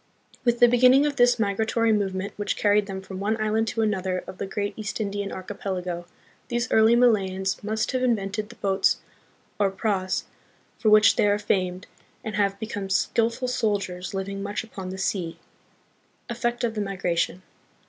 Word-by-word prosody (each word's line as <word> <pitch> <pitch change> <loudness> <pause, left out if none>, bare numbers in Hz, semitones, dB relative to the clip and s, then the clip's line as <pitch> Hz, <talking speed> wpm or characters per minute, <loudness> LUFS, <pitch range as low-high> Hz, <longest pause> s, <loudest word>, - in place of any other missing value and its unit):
With 240 -2 +2
the 240 - +8
beginning 250 +3 +5
of 290 -1 -1
this 245 -1 +5
migratory 220 +2 +1
movement 195 -1 -1
which 205 - -2
carried 205 0 +3
them 190 -1 -6
from 190 -1 -7
one 215 +3 -1
island 215 +1 +1
to 225 +1 0
another 190 -3 -1
of 185 - -10
the 195 - -3
great 205 +1 -3
East 215 0 -5
Indian 200 -1 -3
Archipelago, 185 -2 -5 0.4
these 240 +1 -2
early 220 +1 +5
Malayans 195 -6 +2
must 215 +1 -1
have 255 -1 -1
in 250 -2 +3
vented 205 +1 -4
the 235 - -12
boats 195 -1 +2 0.6
or 200 -1 +3
praus 190 -2 -1 0.6
for 220 - +2
which 215 -1 +6
they - - +4
are 205 0 +3
famed 185 -2 -1 0.4
and 220 - -4
have 200 -1 +1
become 205 -3 -5
skillful 230 +6 +1
sailors 200 -6 -2
living 195 +1 -4
much 205 +2 -3
upon 195 -4 -8
the 190 - -6
sea. 180 -3 -2 0.9
Effect 240 0 -2
of 230 -2 0
the 215 - -2
Migration. 185 -2 -1
205 Hz, 170 wpm, -25 LUFS, 190-225 Hz, 0.9 s, the